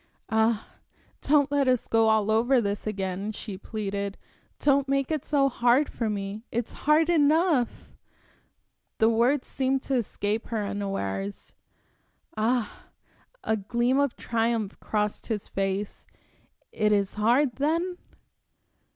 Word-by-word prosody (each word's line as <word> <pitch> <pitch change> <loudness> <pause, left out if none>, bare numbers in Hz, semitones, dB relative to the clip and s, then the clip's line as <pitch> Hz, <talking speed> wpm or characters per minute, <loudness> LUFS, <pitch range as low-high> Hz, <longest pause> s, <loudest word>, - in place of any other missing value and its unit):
"Ah, 220 0 +2 0.6
don't 285 -1 +3
let 285 -2 +2
us 255 -2 +1
go 225 -1 +3
all 220 -1 +2
over 240 +4 +3
this 205 -1 -2
again," 195 0 -3
she 210 -1 -7
pleaded. 200 0 -4 0.4
"Don't 280 -1 +2
make 275 +1 0
it 310 -3 -1
so 280 -2 +2
hard 245 +2 +3
for 230 -2 -2
me. 205 +1 -4
It's 235 0 -3 0.2
hard 310 +1 +5
enough" 315 -4 +2 1.0
The 220 - +4
words 250 +5 +2
seemed 265 0 -1
to 275 - -3
escape 220 -2 -1
her 220 -3 -2
unawares. 150 - -4 0.8
"Ah!" 225 +1 -1 0.6
A 220 - +1
gleam 240 +6 0
of 280 -3 +1
triumph 225 -3 -1
crossed 210 -1 -2
his 215 -4 -3
face. 195 +1 -3 0.6
"It 210 -1 +1
is 200 -2 +1
hard, 240 +5 +2
then?" 335 +6 0
225 Hz, 125 wpm, -26 LUFS, 205-270 Hz, 1.0 s, hard